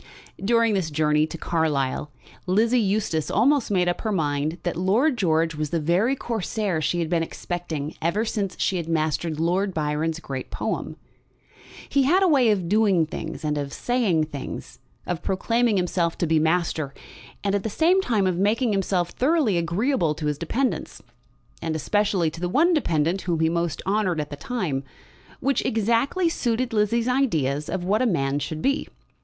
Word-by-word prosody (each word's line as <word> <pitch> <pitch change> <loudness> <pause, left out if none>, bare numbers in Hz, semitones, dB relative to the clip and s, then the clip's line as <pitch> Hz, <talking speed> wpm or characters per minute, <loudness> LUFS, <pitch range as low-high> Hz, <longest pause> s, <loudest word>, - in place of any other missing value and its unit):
During 230 +1 +3
this 185 -5 0
journey 150 0 +2
to 165 - -7
Carlisle 150 -4 -1 0.4
Lizzie 225 +6 +3
Eustace 195 -6 0
almost 265 +5 +3
made 180 -3 +2
up 175 - -1
her 220 - -1
mind 150 -2 -1
that 175 - -2
Lord 215 - +2
George 165 -5 +1
was 150 -1 -3
the 165 - 0
very 180 - +2
Corsair 210 -7 -2
she 175 - 0
had 170 -2 0
been 170 0 +1
expecting 165 -3 -4
ever 185 +7 0
since 200 -4 -2
she 190 - +1
had 170 -2 -4
mastered 155 0 -1
Lord 180 +3 0
Byron's 155 +1 -1
great 135 -5 -6
poem. - - -3 0.9
He 280 - +2
had 350 +9 +4
a - - +5
way 270 -8 +4
of 190 -5 +1
doing 200 -4 +3
things 160 0 -6
and 150 -1 0
of 140 -1 -4
saying 220 - +1
things, 145 -3 -7 0.3
of 175 -1 -3
proclaiming 230 +4 +1
himself 175 -2 0
to - - 0
be 160 -1 +3
master, 160 -3 0 0.5
and 200 -1 0
at 200 - +1
the 220 - -3
same 345 - +3
time 220 - +1
of 180 -2 0
making 220 +4 +2
himself 185 -3 0
thoroughly 275 - +2
agreeable 170 - 0
to 155 - -5
his 150 -1 -1
dependants, 245 +10 -2 0.6
and 160 -1 -2
especially 190 0 +1
to 165 - -10
the 180 - -1
one 330 - +3
dependant 175 - +1
whom 170 -3 -1
he 160 0 +3
most 170 -2 -2
honoured 195 -4 +1
at 150 0 -4
the - - -4
time, 155 - -3 0.6
which 275 -2 +1
exactly 230 - +1
suited 250 -5 -1
Lizzie's 225 +2 +1
ideas 155 - 0
of 185 0 -2
what 205 +5 +1
a 255 - +3
man 140 -7 0
should 155 +2 -5
be. 275 +2 +1
180 Hz, 175 wpm, -24 LUFS, 160-225 Hz, 0.9 s, a